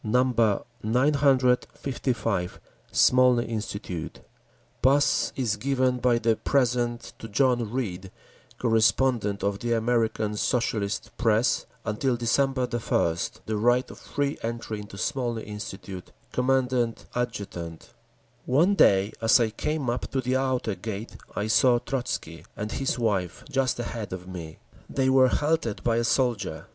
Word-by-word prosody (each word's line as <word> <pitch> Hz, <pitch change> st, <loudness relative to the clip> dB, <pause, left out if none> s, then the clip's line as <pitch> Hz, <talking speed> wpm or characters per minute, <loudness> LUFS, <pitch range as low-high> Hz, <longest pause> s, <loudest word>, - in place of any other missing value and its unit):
955 125 Hz, -1 st, +1 dB, 0.3 s
Smolny 125 Hz, -1 st, +4 dB
Institute 100 Hz, -6 st, -5 dB, 0.6 s
PASS 140 Hz, +2 st, +3 dB
Is 115 Hz, -6 st, 0 dB
given 130 Hz, +1 st, +1 dB
by 120 Hz, -1 st, +3 dB
the 115 Hz, -1 st, +2 dB
present 120 Hz, -3 st, 0 dB
to 115 Hz, -, -7 dB
John 120 Hz, -1 st, +1 dB
Reed, 100 Hz, -7 st, -3 dB, 0.5 s
correspondent 115 Hz, -2 st, +2 dB
of 100 Hz, 0 st, 0 dB
the 120 Hz, 0 st, -1 dB
American 110 Hz, -2 st, 0 dB
Socialist 110 Hz, -3 st, -1 dB
press, 115 Hz, +1 st, +2 dB, 0.2 s
until 115 Hz, +4 st, 0 dB
December 130 Hz, +2 st, +1 dB
1, 110 Hz, -8 st, 0 dB, 0.3 s
the 110 Hz, -1 st, -2 dB
right 120 Hz, +4 st, +2 dB
of -, -, -12 dB
free 145 Hz, 0 st, -2 dB
entry 115 Hz, -2 st, -4 dB
into 105 Hz, -1 st, -10 dB
Smolny 120 Hz, -3 st, -2 dB
Institute. 95 Hz, -3 st, -8 dB, 0.2 s
Commandant 125 Hz, -2 st, +1 dB
Adjutant 100 Hz, -9 st, -5 dB, 0.5 s
One 160 Hz, +10 st, +4 dB
day 100 Hz, -, +4 dB
as 115 Hz, +3 st, +5 dB
I 115 Hz, -2 st, +1 dB
came 150 Hz, +4 st, -2 dB
up 120 Hz, +1 st, -2 dB
to 135 Hz, -, -1 dB
the 130 Hz, +1 st, 0 dB
outer 130 Hz, -4 st, 0 dB
gate 110 Hz, +2 st, -6 dB, 0.2 s
I 105 Hz, -, -1 dB
saw 120 Hz, +3 st, +4 dB
Trotzky 120 Hz, -, -4 dB
and 105 Hz, 0 st, -4 dB
his 135 Hz, -2 st, -1 dB
wife 100 Hz, -7 st, -1 dB
just 135 Hz, -2 st, +1 dB
ahead 115 Hz, -4 st, -4 dB
of 90 Hz, 0 st, -7 dB
me. 85 Hz, -4 st, -8 dB, 0.3 s
They 130 Hz, -1 st, +1 dB
were 130 Hz, -1 st, +6 dB
halted 145 Hz, -5 st, 0 dB
by 115 Hz, -1 st, +2 dB
a 120 Hz, -, +1 dB
soldier. 110 Hz, -, 0 dB
120 Hz, 130 wpm, -26 LUFS, 105-130 Hz, 0.6 s, were